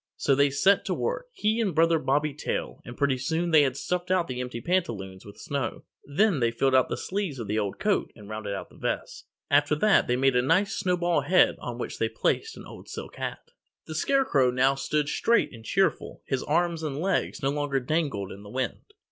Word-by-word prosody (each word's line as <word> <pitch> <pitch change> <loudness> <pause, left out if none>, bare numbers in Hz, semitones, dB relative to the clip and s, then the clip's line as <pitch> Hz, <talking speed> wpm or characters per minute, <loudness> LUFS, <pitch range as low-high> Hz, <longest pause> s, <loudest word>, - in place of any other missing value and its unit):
So 140 - +2
they 140 +1 +4
set 185 +9 +3
to - - -1
work, - - -2
he 220 - 0
and 195 -8 -1
Brother 165 0 +4
Bobby 145 +1 0
Tail, 145 - -4
and 120 - -10
pretty 140 -3 +1
soon 160 +6 -1
they 155 -2 +7
had 135 -2 0
stuffed 180 0 -2
out 185 -2 +2
the 125 0 -4
empty 125 -1 -5
pantaloons 110 - -2
with 100 - -12
snow. 140 -3 -4 0.2
Then 170 +3 +2
they 120 -2 +2
filled 130 +3 +1
the 130 -1 +3
sleeves 190 -7 -3
of 115 - -5
the 105 +2 -1
old 100 -2 -3
coat 210 -1 0
and 105 -3 -13
rounded 110 -1 -4
out - - -7
the - - -17
vest. - - -4 0.2
After 145 +1 +4
that 210 +6 +3
they 125 - +2
made 135 0 +2
a 125 - +4
nice 190 +10 +2
snowball 175 -4 +1
head 180 +6 +4
on 120 -1 -6
which 120 - -5
they 115 - +1
placed 110 - -1
the - - -10
old - - -12
silk - - -8
hat. - - -6 0.3
The 155 - -7
Scarecrow 160 - +2
now 130 +2 +3
stood 145 +2 -1
straight 230 - +2
and 115 -1 -11
cheerful. 195 +11 0
His 135 -1 -1
arms 170 +1 0
and 150 -3 -3
legs 185 -4 -1
no 135 - +2
longer 145 -2 -1
dangled 135 - -2
in 100 - -10
the 105 - -11
wind. 130 +3 -3
145 Hz, 215 wpm, -27 LUFS, 125-175 Hz, 0.3 s, they